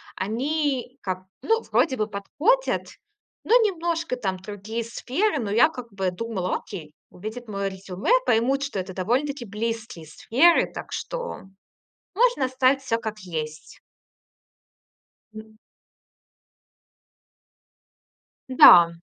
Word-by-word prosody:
они 265 +4 -2
как, 185 -1 -3 0.2
ну, 450 +1 +1
вроде 265 -6 +3
бы 215 0 0
подходят, 310 - 0 0.6
но 455 - +1
немножко 335 - -1
там 190 -5 -2
другие 210 +4 -6
сферы, 280 - -1
но 205 -3 -3
я 240 +9 +5
как 245 -6 -9
бы 190 -2 -1
думала: 190 -2 -3
"Окей, 155 -7 -10 0.2
увидят 220 +6 -8
моё 200 -1 -2
резюме, 190 - -4
поймут, 260 +5 +2
что 275 -8 -3
это 185 0 -5
довольно-таки 245 +7 -1
близкие 215 -5 -5
сферы, 290 - +3
так - - -8
что - - -5 0.7
можно 470 - +3
оставить 260 +1 +2
всё 230 -3 0
как 220 -2 -5
есть". 155 -4 -6 1.6
М. 220 0 -12 2.9
Да. 175 -9 +9
230 Hz, 110 wpm, -24 LUFS, 195-280 Hz, 2.9 s, Да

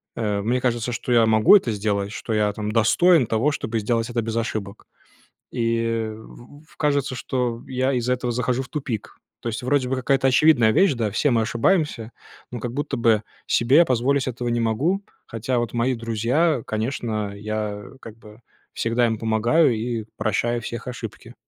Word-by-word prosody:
э, 105 -3 -1
мне 120 +5 0
кажется, 120 -1 -1
что 125 - -4
я 115 -2 +5
могу 110 - +6
это 155 - +3
сделать, 100 -1 -1
что 115 - -4
я 105 -1 +2
там 105 0 -4
достоин 135 +8 +4
того, 115 +8 +1
чтобы 115 -5 -3
сделать 115 +2 -1
это 120 -1 -1
без 115 0 -4
ошибок. 110 -3 -4 0.7
И 115 -1 -1
в 145 +7 -15
кажется, 140 -3 0
что 125 -2 -2
я 130 +1 0
из-за 125 0 0
этого 125 -1 -2
захожу 125 +1 -1
в 125 - -14
тупик. 130 -8 -5 0.2
То - - -5
есть 115 +2 -5
вроде 130 0 +1
бы 130 - 0
какая-то 135 +1 +1
очевидная 130 -4 +5
вещь, 190 - +4
да, 115 -4 -2
все 145 +7 +1
мы 115 -2 +3
ошибаемся, 115 - 0 0.4
но 120 - -5
как 120 0 -5
будто 145 +3 -3
бы 115 -2 +3 0.2
себе 125 +5 +3
я 170 - +7
позволить 130 +1 +1
этого 120 -1 -3
не 120 0 0
могу, 135 - 0 0.2
хотя 120 +2 -2
вот 120 -2 -2
мои 120 +2 +1
друзья, 115 +7 0
конечно, 110 -2 -2
я 105 0 -4 0.2
как 115 -1 -11
бы 110 0 -16 0.3
всегда 115 +1 +1
им 115 -1 -1
помогаю 115 +7 +2
и 115 0 -3
прощаю 115 +2 0
всех 120 +2 -6
ошибки. 125 -1 -8
120 Hz, 180 wpm, -23 LUFS, 110-130 Hz, 0.7 s, я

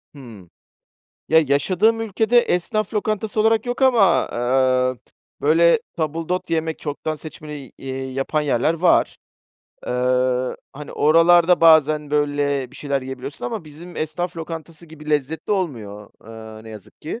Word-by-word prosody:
Hıı. 110 -10 -13 0.8
Ya, 160 - +6
yaşadığım 185 +11 +2
ülkede 225 +2 +2
esnaf 215 +2 -1
lokantası 215 0 -2
olarak 220 +1 +2
yok 245 +2 -4
ama, 230 -9 +4
eee, 130 +1 +1
p - - -33 0.3
böyle 170 +7 +4 0.2
tabildot 165 +3 -2
yemek, 160 -1 -2
çoktan 155 +1 -4
seçmeli 155 0 -10
y 130 - -14
eee, 130 0 -6
yapan 135 +3 -1
yerler 145 +1 +1
var. 170 +1 +2 0.7
Eee, 125 0 0 0.2
hani, 145 +1 -9
oralarda 170 +3 +4
bazen, 155 -2 +4
böyle, 145 -3 0
bir - - -15
şeyler 140 -2 -2
yiyebiliyorsun 130 0 -7
ama 125 - -5
bizim 160 +3 -12
esnaf 170 +3 -3
lokantası 165 0 -8
gibi 155 -1 -10
lezzetli 150 +4 -2
olmuyor, 110 - -4 0.5
eee, 110 - -14
ne 110 - -11
yazık 105 -3 -13
ki. 160 - -6
155 Hz, 140 wpm, -21 LUFS, 135-175 Hz, 0.8 s, Ya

